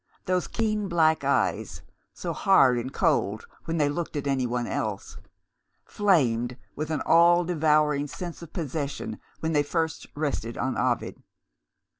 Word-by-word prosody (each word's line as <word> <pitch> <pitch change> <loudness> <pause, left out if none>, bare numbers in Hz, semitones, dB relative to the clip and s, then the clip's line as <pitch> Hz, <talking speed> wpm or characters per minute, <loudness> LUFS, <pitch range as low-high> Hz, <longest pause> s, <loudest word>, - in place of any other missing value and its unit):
Those 185 -1 0
keen 215 -2 -1
black 160 -3 +2
eyes, - - 0 0.3
so - - -5
hard 135 - +4
and 130 +3 -5
cold 140 - 0 0.2
when 165 0 -2
they 150 -2 +3
looked 160 +3 -3
at 145 - -3
anyone 125 -3 0
else 105 -4 -4 0.7
flamed 125 - +1 0.2
with 155 +1 -4
an 155 - -1
all 170 +1 +5
devouring 150 -3 +2
sense 175 +3 -7
of 170 - -10
possession 145 - -4 0.2
when 160 0 -1
they 145 - +4
first 160 +1 -2
rested 140 -6 -3
on 130 - -1
Ovid. - - -1
155 Hz, 140 wpm, -26 LUFS, 130-170 Hz, 0.7 s, all